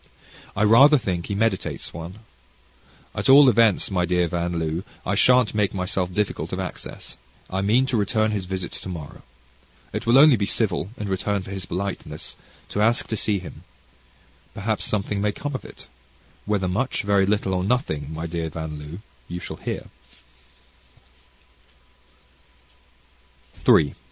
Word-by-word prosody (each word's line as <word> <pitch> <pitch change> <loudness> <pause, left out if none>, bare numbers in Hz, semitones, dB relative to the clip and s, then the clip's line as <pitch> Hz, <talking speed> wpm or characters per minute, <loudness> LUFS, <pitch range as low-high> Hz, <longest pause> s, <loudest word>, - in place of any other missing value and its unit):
I 105 - +1
rather 135 +8 +7
think 90 -8 -3
he 100 - -3
meditates 105 -2 -1
one. 85 +5 -8 0.9
At - - -1
all 140 +1 +9
events, 115 -4 +3
my 90 -2 +1
dear 90 0 +1
Van 85 0 -2
L., 80 +1 -2 0.2
I - - 0
shan't 125 +2 +4
make 105 -2 +1
myself 90 -1 -1
difficult 105 +2 -2
of - - -3
access; - - -7 0.3
I 95 +1 -1
mean 115 +7 +3
to 130 -1 -1
return 110 +1 +1
his 100 -4 -3
visit 95 -1 -4
tomorrow. 85 -6 -8 0.7
It - - -4
will 115 - +4
be - - +8
only 135 -9 +6
civil 100 -4 0
in 105 - -4
return 100 +1 -1
for 95 - -9
his 95 -2 -5
politeness, 100 +2 -5 0.3
to 105 - -1
ask 115 +2 +3
to 110 - -1
see 105 -1 +1
him. 90 -3 -10 0.9
Perhaps 110 +2 -2
something 100 -1 -1
may 105 0 +1
come 145 +5 -5
of 130 - -4
it. - - -12 0.6
Whether 100 -3 0
much, 110 +7 -1
little, 100 -1 +2
or 90 0 0
nothing, 80 - -1
my 80 +1 -5
dear 85 -1 -3
Van 80 -1 -6
L., 75 +5 -8 0.3
you 90 - -5
shall - - -7
hear. - - -5
100 Hz, 150 wpm, -23 LUFS, 90-110 Hz, 0.9 s, all